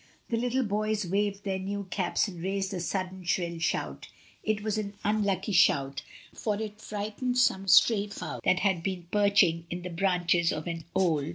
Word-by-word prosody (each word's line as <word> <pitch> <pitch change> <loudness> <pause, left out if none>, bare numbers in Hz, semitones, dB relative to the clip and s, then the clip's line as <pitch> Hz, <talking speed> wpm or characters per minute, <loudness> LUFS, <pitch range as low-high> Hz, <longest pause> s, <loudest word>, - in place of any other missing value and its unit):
The 235 - 0
little 250 +2 +1
boys 215 -1 -1
waved 200 +2 -1
their 190 -1 -2
new 200 +2 -3
caps 190 +3 +1
and 180 -4 -8
raised 195 +1 -2
a 185 - -2
sudden 185 +1 -3
shrill 170 -1 -1
shout 165 - -2 0.3
It 215 -1 -1
was 215 0 -1
an 200 -1 -5
unlucky 210 0 0
shout, 140 -7 +3 0.3
for 210 -2 -2
it 215 -1 -6
frightened 215 +5 -3
some 195 -6 +2
stray 205 +1 +6
fo^ 205 - -6
that 185 - +2
had 190 -4 +2
been 180 -1 -3
perching 200 -5 +3
in 175 +1 -5
the 180 - -5
branches 175 -1 +2
of 155 - -4
an 165 -2 -5
old 190 -2 +4
A - - +3
WEDDING - - +1
PARTY. 145 +1 -3
195 Hz, 195 wpm, -28 LUFS, 175-210 Hz, 0.3 s, stray